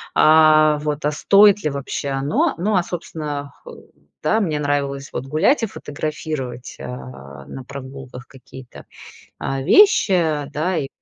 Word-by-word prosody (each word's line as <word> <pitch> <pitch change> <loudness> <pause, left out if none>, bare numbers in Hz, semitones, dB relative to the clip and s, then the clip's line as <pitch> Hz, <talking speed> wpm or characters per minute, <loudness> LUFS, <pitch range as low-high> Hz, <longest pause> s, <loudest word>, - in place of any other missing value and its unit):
а, 155 -1 +5
вот, 150 -1 -3
а 150 - +2
стоит 200 +6 +4
ли 150 - 0
вообще 140 0 -4
оно? 135 +2 0
Но, 200 +3 0
а, 175 - +2
собственно 150 -5 -6
хол - - -13 0.3
да, 220 +9 +2
мне 155 -6 -1
нравилось, 140 -1 -2
вот, 135 - -5
гулять 190 - +2
и - - +1
фотографировать, 145 -6 -6
а, 65 +2 -9
на 135 - -8
прогулках 130 -2 -10
какие-то, 130 -1 -14 0.5
а, 135 0 -3
вещи, 395 - +5
а, 155 -5 0
да. 170 +4 -1
И 135 - -2
145 Hz, 145 wpm, -20 LUFS, 135-160 Hz, 0.5 s, а